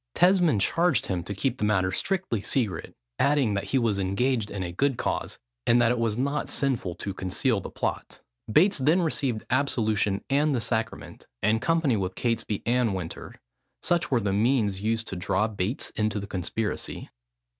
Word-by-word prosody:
Tesmond 175 - +4
charged 170 - +2
him 90 -3 -2
to 100 - -5
keep 130 +6 -1
the - - -2
matter 95 -3 +2
strictly 185 - -1
secret, 110 -3 -2 0.2
adding, 140 -7 +3
that 100 - -2
he 135 - 0
was 115 -5 +1
engaged 105 +4 0
in 100 -2 -4
a 85 - -4
good 135 +7 0
cause, - - -2 0.3
and 120 - +5
that 120 -1 +4
it 125 - 0
was 115 -2 0
not 140 +3 -1
sinful 120 -11 -1
to 100 +2 -5
conceal 100 +5 0
the - - -7
plot. - - -4 0.3
Bates 185 - +4
then 160 +7 +3
received 135 -8 -1
absolution 110 -7 +1
and 145 +1 +2
the - - +1
sacrament, 110 -1 -4 0.2
in 110 +2 +3
company 165 -5 +2
with 95 -1 -3
Catesby 115 -3 -1
and 120 -4 +2
Winter. 85 -3 -6 0.5
Such 175 -1 +1
were 125 - +3
the 100 -1 0
means 105 -3 +1
used 110 +1 0
to - - -4
draw 95 +4 0
Bates 105 +3 -3
into 105 -1 -1
the 100 - -5
conspiracy. 105 +3 -4
115 Hz, 175 wpm, -26 LUFS, 100-135 Hz, 0.5 s, and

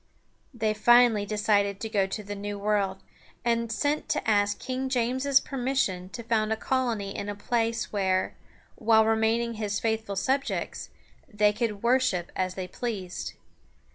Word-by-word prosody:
They 220 -4 0
finally 230 -1 +5
decided 205 -2 +1
to 225 - -3
go 200 -3 +1
to 210 +2 -5
the 205 0 -6
New 205 0 -5
World, 200 -2 0 0.4
and 230 -1 +1
sent 290 +6 -1
to - - -1
ask 205 -1 +2
King 260 +1 -3
James's 260 +2 +2
permission 250 -9 -1
to 235 +4 -7
found 220 -1 +1
a - - +3
colony 230 -6 -1
in 200 - -4
a 205 - -3
place 230 +2 -1
where, 190 -2 +1 0.4
while 220 0 +4
remaining 225 +1 +1
his 205 -1 -1
faithful 220 -2 -1
subjects, 265 +8 -1 0.4
they 210 -1 +3
could 210 -2 -2
worship 235 -8 +2
as 185 0 -1
they 185 -1 -4
pleased. 190 -3 -5
220 Hz, 150 wpm, -27 LUFS, 200-235 Hz, 0.4 s, finally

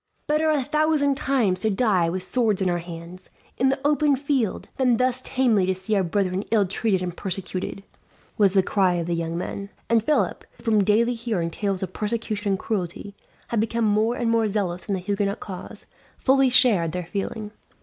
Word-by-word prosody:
"Better 305 +1 +2
a 295 -3 +2
thousand 300 0 +2
times 250 -10 +1
to 220 - +2
die 195 -5 +2
with 180 +2 -3
swords 220 -1 +1
in 185 -2 +1
our 175 - 0
hands, 170 +2 -10 0.3
in 265 - +3
the 270 +1 0
open 295 -1 +3
field, 270 -6 -1
than 250 -3 +3
thus 255 +1 +1
tamely 230 -8 +2
to 190 - +1
see 190 +3 -1
our 195 - +3
brethren 185 +1 0
ill 215 -3 +3
treated 195 0 0
and 175 -1 -4
persecuted!" 190 0 -3 0.5
was 200 -3 +3
the 190 -2 +4
cry 185 -2 +2
of 170 -1 -2
the 170 - -1
young 165 0 -2
men; 200 +3 -5 0.2
and 230 -2 +4
Philip, 305 +5 0
who - - -18
from 215 -3 +3
daily 225 +4 +3
hearing 220 -8 -2
tales 195 0 -2
of 185 -1 -5
persecution 210 -2 -2
and - - 0
cruelty 195 -1 -4 0.4
had 230 - 0
become 230 +1 0
more 215 +3 +2
and 235 -2 0
more 225 -1 +2
zealous 190 -4 -2
in 200 - 0
the - - -3
Huguenot 200 +1 -1
cause, 185 -3 -7 0.3
fully 270 0 +3
shared 205 -10 +4
their 180 -1 -3
feeling. 205 +4 -4
205 Hz, 195 wpm, -24 LUFS, 185-240 Hz, 0.5 s, the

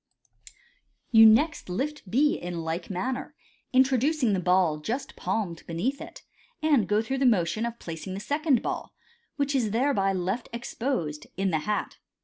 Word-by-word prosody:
You 225 -1 +9
next 290 - +3
lift 270 +3 -3
B 290 +8 +3
in 175 -1 -4
like 165 +2 -4
manner, 245 +8 -3 0.4
introducing 260 -1 +3
the 190 - +1
ball 180 -3 +2
just 235 - -4
palmed 180 -7 -2
beneath 220 +12 -2
it, - - -10 0.4
and 295 -9 +3
go 210 +2 +2
through 265 +4 -2
the 270 - +4
motion 215 +1 +2
of 235 0 -6
placing 170 +1 -6
the - - -4
second 290 +2 +1
ball, - - -4 0.4
which 285 0 0
is 245 -6 +1
thereby 225 -3 +1
left 190 +6 -2
exposed, 235 - -3
in 195 0 0
the 160 - +1
hat. 210 - -2
220 Hz, 155 wpm, -27 LUFS, 180-265 Hz, 0.4 s, You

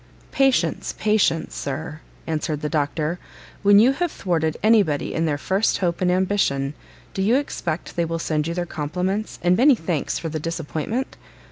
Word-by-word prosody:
"Patience, 270 -1 +1
patience, 210 -6 +1
Sir," 140 +2 -5 0.3
answered 155 -1 -2
the 150 - -2
Doctor; 155 +3 -1 0.4
"when 200 0 +6
you 235 +5 +6
have 340 +4 -1
thwarted 160 -4 -1
any 220 0 +6
body 150 -7 -2
in 165 - 0
their 145 -2 0
first 190 +8 +1
hope 175 -2 -1
and 180 -1 +3
ambition, 180 -7 +1 0.4
do 190 - -2
you 215 +6 +3
expect 175 - -3
they 170 - +1
will 165 0 -2
send 155 -2 -1
you 170 - -3
their 175 -1 -1
compliments 180 +7 -3
and 175 +1 +4
many 265 +6 +6
thanks 165 -6 -2
for 165 - -4
the 155 0 -3
disappointment? 165 - -3
170 Hz, 170 wpm, -23 LUFS, 155-205 Hz, 0.4 s, when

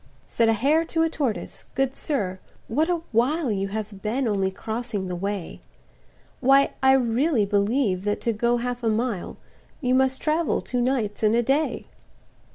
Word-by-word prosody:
Said 230 -1 +2
a - - +4
hare 285 +9 +2
to 325 0 0
a 325 - +2
tortoise, 265 -10 -3
"Good 270 -1 +1
sir, 195 -13 -2 0.3
what 305 +9 +1
a 345 -2 0
while 255 +4 +1
You 195 -1 -1
have 205 -1 -5
been 240 +5 -1
only 195 -3 +1
crossing 220 +1 -4
the 180 -1 -4
way; 195 0 -4 0.8
Why 275 +2 +4
I 265 0 +6
really 250 0 +2
believe 200 -1 +1
that 205 0 0
to 230 - 0
go 235 +3 +1
half 245 0 -3
a 225 - +2
mile, 220 -3 -2 0.4
You 255 -3 0
must 265 0 +2
travel 315 +1 +1
two 250 -1 -2
nights 240 -5 -1
and 215 0 +3
a 240 - +3
day." 280 +6 0
235 Hz, 170 wpm, -24 LUFS, 210-270 Hz, 0.8 s, I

